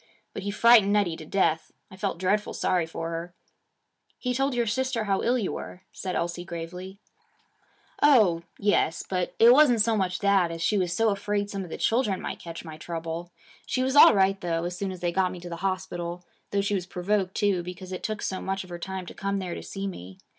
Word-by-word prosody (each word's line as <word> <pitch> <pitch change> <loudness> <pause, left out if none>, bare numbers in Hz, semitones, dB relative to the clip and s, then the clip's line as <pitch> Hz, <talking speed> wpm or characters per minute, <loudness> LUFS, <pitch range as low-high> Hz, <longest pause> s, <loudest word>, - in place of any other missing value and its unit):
But - - -5
he 200 - -3
frightened 215 -1 +6
Nettie 200 -5 +2
to 155 - -10
death. 160 -4 +1 0.2
I - - -10
felt 190 -2 -2
dreadfully 195 +4 0
sorry 175 -3 +1
for 165 0 -5
her.' 170 +1 -6 0.8
'He 250 -1 -2
told 270 +1 0
your 240 -1 +1
sister 245 +1 -1
how 195 -2 0
ill 245 +2 +2
you 215 -6 -1
were,' 185 - -7
said 185 -1 -5
Elsie 175 +1 -2
gravely. 180 +3 -7 1.0
'Oh, 215 - +5 0.2
yes. 200 -5 +1
But 180 -2 -2
it 235 +2 +8
wasn't 260 -4 +5
so 225 +1 +3
much 185 -3 0
that, 200 -4 +3
as 165 0 -6
she 210 - +2
was 180 -2 0
so 225 +5 +2
afraid 205 0 -2
some 195 -1 -3
of 180 - -9
the - - -5
children 225 -5 +1
might - - -5
catch 170 0 -8
my 160 -1 -8
trouble. 165 +1 -5 0.4
She 255 - 0
was 265 +1 0
all 290 - +9
right 195 0 +2
though 165 -1 -1
as 175 +1 -3
soon 195 +1 -3
as 185 -2 -9
they 175 -1 0
got 185 +1 +1
me 180 - -7
to 175 0 -8
the 170 - -5
hospital, 180 -2 -3 0.2
though 200 - +1
she 200 +1 -1
was 180 -3 -2
provoked 190 +1 -1
too, 200 -4 +1
because 180 +1 -8
it 185 - -5
took 215 -1 -3
so 190 - -2
much 195 0 -2
of 185 - -14
her 175 - -6
time 190 +1 -5
to - - -9
come 200 0 -2
there 185 -3 -4
to - - -6
see 195 0 -6
me. 95 - -7
190 Hz, 225 wpm, -26 LUFS, 175-205 Hz, 1.0 s, all